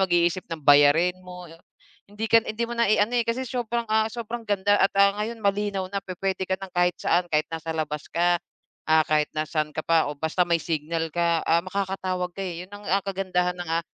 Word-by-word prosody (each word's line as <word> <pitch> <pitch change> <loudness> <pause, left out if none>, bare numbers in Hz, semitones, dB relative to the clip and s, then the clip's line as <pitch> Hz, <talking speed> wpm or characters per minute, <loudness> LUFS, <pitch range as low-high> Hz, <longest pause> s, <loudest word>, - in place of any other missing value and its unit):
mag-iisip 175 -1 +1
ng 165 -2 -5
bayarin 145 +5 +6
mo, 180 -1 -10
yung 165 0 -16 0.5
hindi 215 +2 -4
ka 225 0 +5
na - - -5
hindi 230 +2 -2
mo 240 - -5
na, 235 -3 +2
i-ano, 215 +2 +3
eh, 240 - +3
kasi 255 +3 -1
sobrang, 235 -1 -2
ah, 220 0 +3
sobrang 235 0 -6
ganda 205 0 +2
at, 195 - +5
ah, 200 0 +6
ngayon 225 +1 -4
malinaw 200 -1 0
na 200 - -1
pu-puwede 190 0 -3
ka 190 - +1
ng 190 -1 -10
kahit 175 -1 +2
saan, 175 0 +1
kahit 155 -1 +1
nasa 160 0 -4
labas 150 -1 -3
ka, 175 0 +1 0.5
ah, 160 0 +5
kahit 150 -1 +1
nasaan 155 0 -1
ka 155 - -3
pa 165 -3 +3
o 145 - -5
basta 160 +4 0
may 170 -1 +3
signal 160 0 -2
ka, 170 -1 +1
ah, 165 +1 +3
makakatawag 185 -1 -3
ka, 195 - -8
eh, 180 -1 -5
yun 195 - -21
ang, 205 0 -10
ah, 195 +1 +2
kagandahan 185 -2 -1
ng, 175 - -6
ah, 165 0 0
180 Hz, 225 wpm, -25 LUFS, 165-205 Hz, 0.5 s, bayarin